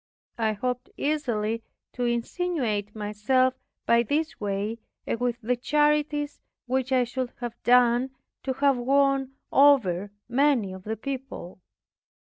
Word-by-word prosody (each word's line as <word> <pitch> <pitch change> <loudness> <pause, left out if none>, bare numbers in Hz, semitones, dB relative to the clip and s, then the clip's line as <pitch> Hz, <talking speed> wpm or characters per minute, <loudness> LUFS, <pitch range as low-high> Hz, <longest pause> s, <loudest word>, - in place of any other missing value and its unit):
I 220 -1 +2
hoped 250 +4 -3
easily 230 -7 -1 0.3
to 245 - -2
insinuate 235 - -1
myself 215 +5 +1 0.3
by 235 0 +5
this 300 +7 -1
way 205 +2 -2 0.3
and 230 - -2
with 245 -1 -1
the 245 +3 +1
charities 295 +2 +1 0.2
which 260 +1 -1
I 255 -1 +4
should 250 +1 -3
have 240 -1 -6
done 245 +1 +4 0.3
to 265 - -2
have 275 0 +3
won 270 +1 +2 0.2
over 215 -10 +4 0.2
many 245 -5 +2
of 190 0 -10
the 220 +1 -3
people. 265 -9 -6
245 Hz, 125 wpm, -26 LUFS, 220-275 Hz, 0.3 s, by